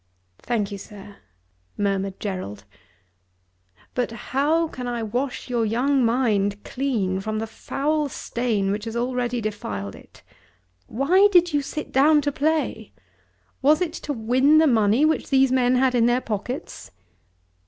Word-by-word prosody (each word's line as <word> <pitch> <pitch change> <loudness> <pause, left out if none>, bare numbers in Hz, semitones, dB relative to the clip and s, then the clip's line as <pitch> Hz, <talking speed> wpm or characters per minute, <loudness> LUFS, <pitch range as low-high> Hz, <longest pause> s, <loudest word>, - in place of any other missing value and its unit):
"Thank 220 -4 -2
you, 200 - -6
sir," 205 0 -12 0.6
murmured 195 -1 -1
Gerald. 185 - -5 1.3
"But 250 - -1
how 285 +8 0
can 250 -5 -7
I 240 -1 -3
wash 245 +5 -3
your 240 -2 0
young 250 +5 +1
mind 210 -4 +1
clean 225 -9 -1
from 215 +2 -3
the 220 - -2
foul 295 +6 -2
stain 225 -7 -2
which 205 +2 -3
has 225 0 -5
already 245 0 -1
defiled 205 - -4
it? - - -17 0.6
Why 355 - +4
did 350 -3 +4
you 290 - +2
sit 300 +2 -6
down 295 +3 +5
to 290 0 -1
play? 285 -7 -1 0.7
Was 300 +3 +4
it 350 -3 -2
to 300 - -5
win 260 +5 +3
the 320 - +6
money 230 0 +3
which 315 0 0
these 270 -1 +4
men 255 -1 +3
had 255 0 +2
in 235 -1 +3
their 240 +1 +2
pockets?" 225 +3 -5
245 Hz, 145 wpm, -23 LUFS, 215-280 Hz, 1.3 s, the